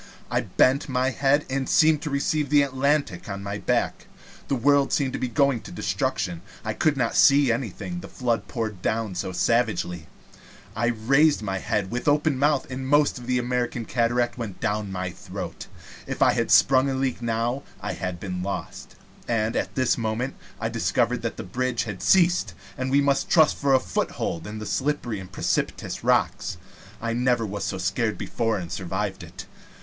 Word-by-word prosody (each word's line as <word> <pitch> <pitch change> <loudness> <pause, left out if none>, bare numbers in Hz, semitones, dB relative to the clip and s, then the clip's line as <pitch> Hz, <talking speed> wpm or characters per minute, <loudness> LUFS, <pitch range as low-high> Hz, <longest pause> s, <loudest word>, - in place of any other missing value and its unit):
I - - +2
bent 135 +3 +2
my 130 0 +1
head, 140 +2 +2
and 130 0 -2
seemed 155 -2 +4
to 150 - -3
receive 145 +1 0
the 145 -1 +5
Atlantic 140 -7 0
on 100 0 -5
my 100 +1 -4
back. - - -1 0.4
The 140 - +1
world 140 +3 +3
seemed 130 -5 -1
going 140 -5 +3
to - - -11
destruction. 85 -2 -2 0.2
I 110 - -1
could 150 +3 +1
not 120 -3 0
see 140 -3 +6
anything, 125 - -3
the - - -9
flood 120 -3 -1
poured 110 -6 -4
down 110 -1 -1
savagely. 90 -2 0 0.7
I 120 +2 +1
raised 135 +5 +3
my 95 -2 -2
head, 100 0 -1
with 125 +4 -3
open 145 -1 +2
mouth, 145 0 +2
and 130 +1 -4
the 130 - -5
most 145 -1 +3
of 120 - -10
the 125 0 +2
American 125 -1 -1
cataract 120 +1 0
went 110 -6 -5
down 105 -1 -1
my 95 -1 -3
throat. - - -7 0.4
If - - 0
I - - +5
had - - 0
sprung 135 +1 +5
a 135 - -1
leak 130 -2 -1
now 120 +3 -1 0.2
I 105 -1 -4
had 90 -2 -4
been 90 -2 -4
lost. 100 +2 -5 0.3
And 115 -1 0
at - - -2
this 130 -2 +2
moment 115 +4 -2 0.3
I - - -1
discovered - - 0
that - - -3
the - - -5
bridge 120 +5 -1
had 105 -5 -6
ceased, 175 - +3 0.2
and 130 0 -3
we 140 +2 +4
must 140 -1 +1
trust 160 -2 +5
for 140 -1 +2
a - - +5
foothold 85 -8 -3
to 105 - -6
the 110 0 -6
slippery 130 -5 -1
and 95 -1 -10
precipitous - - -2
rocks. - - +1 0.4
I 115 0 -2
never 120 -1 +1
was 100 -1 -4
so 95 - -2
scared 100 +4 -1
before 115 -2 -1
and 85 -3 -6
survived 95 +1 -3
it. 90 +2 -9
120 Hz, 185 wpm, -25 LUFS, 105-135 Hz, 0.7 s, see